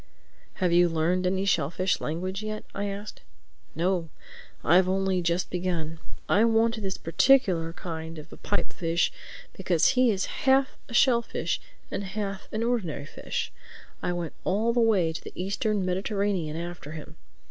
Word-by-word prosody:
"Have 180 -3 +1
you 175 0 +6
learned 170 +3 +1
any 190 +1 0
shellfish 180 +1 +1
language 185 +5 -3
yet?" 215 0 -4
I 200 - -2
asked. 200 +1 -6 0.5
"No. 175 -1 0 0.5
I've 180 +3 +5
only 190 -1 +1
just 170 +1 0
begun. 170 -3 -2 0.3
I 210 - +4
wanted 225 0 +3
this 195 -2 -2
particular 170 - +3
kind 160 -2 -6
of 155 +1 -10
a - - -11
pipe 205 - -2
fish 170 0 +1 0.4
because 175 -4 +2
he 255 -1 +4
is 195 -3 +1 0.2
half 265 0 +4
a - - -8
shellfish 235 -3 +2 0.3
and - - -2
half 195 0 -4
an 220 +1 -1
ordinary 200 -12 -1
fish. - - -4 0.5
I - - -1
went 175 -3 -4
all 220 +5 +1
the 240 - +2
way 200 -8 +3
to - - -6
the - - -9
Eastern 200 +1 -1
Mediterranean 190 -3 -1
after 170 -3 -6
him. 155 0 -9
185 Hz, 155 wpm, -27 LUFS, 170-210 Hz, 0.5 s, you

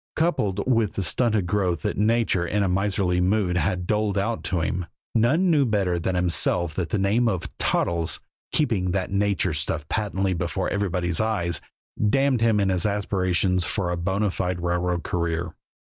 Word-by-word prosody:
Coupled 105 - 0
with 115 -5 +2
the 100 - -2
stunted 110 +2 +1
growth 90 -4 0
that - - -1
nature 110 -3 +2
in 105 +3 +1
a - - +1
miserly 95 -1 +1
mood 95 -1 +1
had 90 0 0
doled 105 0 0
out 110 +3 -1
to 90 -3 0
him, 90 +2 -2 0.3
none 155 +11 +3
knew 150 -3 +4
better 100 -7 +1
than 90 +2 -1
himself 85 -1 +1
that 85 -1 -3
the 105 - 0
name 105 +5 +2
of 95 -6 -3
"Toddles," 85 -1 0 0.3
keeping 95 -12 +1
that 95 -1 -2
nature 100 -3 +1
stuff 75 0 -3
patently 95 -3 0
before 85 +1 -2
everybody's 90 -3 -1
eyes, 95 -7 -1 0.5
damned 135 0 +2
him 115 -2 +3
in 100 -1 +2
his 90 +1 +1
aspirations 95 -3 0
for 90 0 -1
a - - 0
bona 95 +4 0
fide 90 -1 -2
railroad 90 0 0
career. 85 -1 -2
95 Hz, 170 wpm, -24 LUFS, 90-105 Hz, 0.5 s, knew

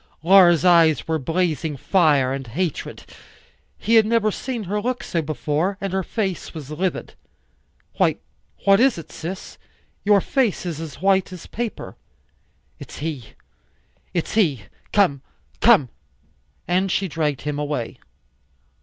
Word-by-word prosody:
Laura's 175 -2 +6
eyes 165 -3 +4
were 160 -1 0
blazing 160 0 -1
fire 145 -6 +2
and 135 -2 -5
hatred; 165 +8 -4 0.7
he 225 - -1
had 225 -2 +6
never 225 -2 +2
seen 245 +1 -4
her 205 +2 -2
look 250 +2 -2
so 165 - -1
before; 155 +5 -2
and 195 -1 -4
her 190 - +1
face, 190 -3 -4
was 150 -2 -8
livid. 180 +4 -3 0.8
"Why, - - +3 0.5
what 195 0 +6
is 260 -3 +4
it, 160 -2 -9
sis? 180 +4 -7 0.4
Your 205 0 +5
face 235 -2 0
is 165 -3 -4
as 160 +1 -9
white 190 -1 +2
as 180 -3 -9
paper." 235 -1 -5 0.8
"It's - - -10
he, 145 -6 -5 0.8
it's 170 - -2
he. 155 - +2 0.3
Come, 180 -10 +2 0.4
come," 210 - +5 0.8
and 185 +2 +1
she 195 - 0
dragged 150 -4 -2
him 150 -1 -3
away. 145 -6 -3
175 Hz, 135 wpm, -22 LUFS, 150-195 Hz, 0.8 s, Laura's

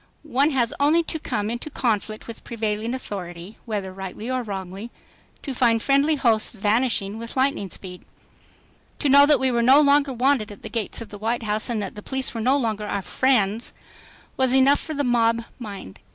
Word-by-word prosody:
One 285 0 +2
has 250 -6 0
only 305 +4 +4
to 320 - -4
come 210 -7 -2
into 240 +6 -5
conflict 220 -5 -2
with 230 - -9
prevailing 225 +1 -2
authority, 180 -5 -7
whether 200 -5 -4
rightly 195 +5 -6
or 255 0 0
wrongly, 195 0 -6 0.5
to 275 - -4
find 235 -3 +3
friendly 280 +5 +2
hosts 230 -6 +2
vanishing 215 -1 0
with 230 +3 -7
lightning 260 -7 +1
speed. 180 +1 -9 0.9
To 290 - 0
know 280 +1 +7
that 295 - +5
we 265 -1 +1
were 235 -1 +1
no 260 +4 +6
longer 285 -1 +4
wanted 250 -3 +1
at 205 - -13
the - - -6
gates 225 -1 -3
of - - -15
the 205 - -9
White 230 +3 -1
House 215 +1 0
and 235 -2 -1
that 195 - -6
the 210 - -9
police 265 +4 -3
were 230 - -4
no 260 +5 +3
longer 215 -5 -2
our 200 -1 -2
"friends" 230 -3 +1 0.6
was 260 -1 +3
enough 270 +2 +5
for 310 - -6
the 285 - 0
mob 230 -2 +2 0.2
mind. 200 - -8
230 Hz, 195 wpm, -23 LUFS, 210-265 Hz, 0.9 s, know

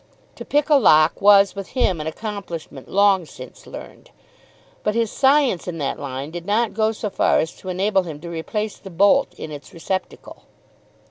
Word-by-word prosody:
To - - -7
pick 295 0 +1
a 295 - +7
lock 155 - +4
was 200 -1 +6
with 195 -1 -8
him 185 -10 +1
an 155 - -5
accomplishment 170 - -7
long 195 -3 +3
since 130 -3 -12
learned. - - -11 0.7
But 210 - -1
his 230 -2 0
science 270 - +2
in 175 -2 -4
that 140 -3 -3
line 140 +1 -6
did 175 +1 -8
not 220 +2 +1
go 220 +1 +1
so 215 -2 -5
far - - +2
as 160 - -1
to 185 - -9
enable 190 +2 +1
him 160 -5 -8
to 170 - -8
replace 210 +6 -4
the 195 - -11
bolt 200 +10 +3
in 155 - -7
its 145 +1 -10
receptacle. 185 +3 -5
195 Hz, 185 wpm, -21 LUFS, 160-210 Hz, 0.7 s, a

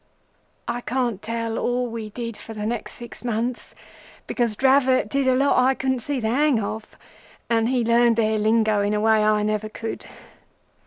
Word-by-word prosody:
"I 235 +1 -2
can't 240 -5 -2
tell 230 0 -3
all 245 +1 0
we 225 -2 -6
did 230 +1 -6
for 225 - -10
the 210 0 -4
next 230 +1 -3
six 240 0 -10
months 240 +1 -3 0.5
because 235 -4 0
Dravot 265 -1 +3
did 275 +1 0
a 260 - +4
lot 275 0 +3
I 265 +1 +3
couldn't 260 -1 -1
see 275 +3 -2
the 220 -2 -1
hang 275 0 +2
of, 215 +1 -6 0.5
and 225 0 +2
he 250 -2 +1
learned 235 0 +4
their 220 -1 +1
lingo 215 -1 +2
in 205 +1 0
a - - +1
way 220 0 +3
I 210 0 +2
never 215 0 -1
could. 225 +1 -6
230 Hz, 180 wpm, -23 LUFS, 215-250 Hz, 0.5 s, a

